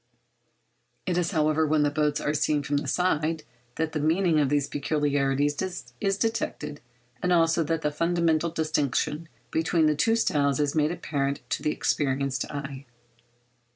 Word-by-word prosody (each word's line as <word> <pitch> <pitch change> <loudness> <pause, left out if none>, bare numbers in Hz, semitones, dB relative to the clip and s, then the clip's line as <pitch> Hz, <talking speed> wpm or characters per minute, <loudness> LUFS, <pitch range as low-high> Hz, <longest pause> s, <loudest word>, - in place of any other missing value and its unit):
It 180 - 0
is, 175 -1 +1
however, 155 -2 +2
when 150 0 +3
the 145 - +2
boats 150 0 +1
are 150 - -1
seen 150 0 +1
from 145 +1 0
the 145 - -3
side 160 -3 0 0.3
that 160 0 -1
the 155 - -2
meaning 160 +2 +2
of 145 -3 +2
these 145 -1 +1
peculiarities 145 -1 0 0.5
is 195 0 +1
detected, 175 -9 -2 0.4
and 180 - 0
also 165 -1 +3
that 165 +1 -1
the 150 - +1
fundamental 170 0 +1
distinction 155 0 -1 0.2
between 165 0 +2
the 155 - +4
two 225 +10 +2
styles 140 - +1
is 145 -1 +1
made 155 0 +2
apparent 140 -5 -2
to - - -1
the - - 0
experienced 135 -3 0
eye. 140 -2 -6
150 Hz, 155 wpm, -26 LUFS, 145-165 Hz, 0.5 s, the